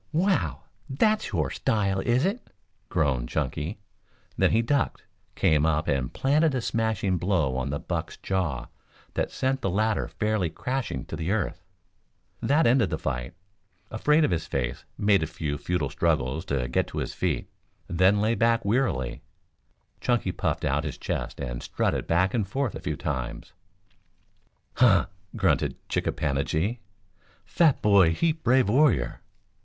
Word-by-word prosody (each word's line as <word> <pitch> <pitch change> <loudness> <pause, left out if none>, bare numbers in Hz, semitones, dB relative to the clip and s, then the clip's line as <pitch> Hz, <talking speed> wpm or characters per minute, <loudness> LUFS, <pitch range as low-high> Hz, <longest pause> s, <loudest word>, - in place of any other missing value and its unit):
"Wow! 185 +4 +1 0.3
That's 215 - +1
your 75 -9 0
style, 95 -3 0
is 120 - +2
it?" 205 +6 -2 0.4
groaned 65 -7 0
Chunky, 80 +8 -2 0.6
then - - +3
he 115 +1 +2
ducked, 140 +2 0 0.3
came 75 -2 +3
up 80 0 +1
and 65 -4 0
planted 145 +2 +2
a 125 - 0
smashing 110 -5 0
blow 85 -8 +1
on 65 +1 -2
the 70 - -1
buck's 80 +1 -4
jaw 85 -10 -2 0.5
that - - -1
sent 135 0 -1
the 95 - 0
latter 110 +4 +1
fairly 105 -5 -1
crashing 125 - -3
to 80 +2 -4
earth. 100 -3 -1 0.8
That 150 +3 +3
ended 120 -3 +4
the 80 - -2
fight. 65 0 -4 0.6
Afraid 150 +8 +3
Of - - -1
His 85 -2 -1
Face 60 -3 -3
made 100 -2 +3
a 80 - -1
few 75 -3 -3
futile 85 -6 -1
struggles 70 +5 0
to 70 -7 -1
get 65 - 0
to - - -8
his - - -2
feet, - - -1 0.4
then 95 +4 +3
lay 110 +2 +2
back 115 -1 +2
wearily. 100 - 0 0.8
Chunky 120 -7 +1
puffed - - -2
out 70 +3 +1
his 75 -4 -5
chest - - -4
and - - -4
strutted - - -1
back 90 +3 +2
and 110 -5 0
forth 130 +1 -1
a - - -6
few - - -2
times. 65 -4 -4 1.2
"Huh!" 105 -8 +5 0.3
grunted - - +1
Chick - - -1
a - - +2
pan 70 -2 -1
a 70 - +1
gi. 100 +10 -1 0.7
"Fat 160 -5 +2
boy 95 -6 +5
heap 160 - 0
brave 130 -2 +4
warrior." 115 - +2
95 Hz, 155 wpm, -26 LUFS, 75-120 Hz, 1.2 s, Huh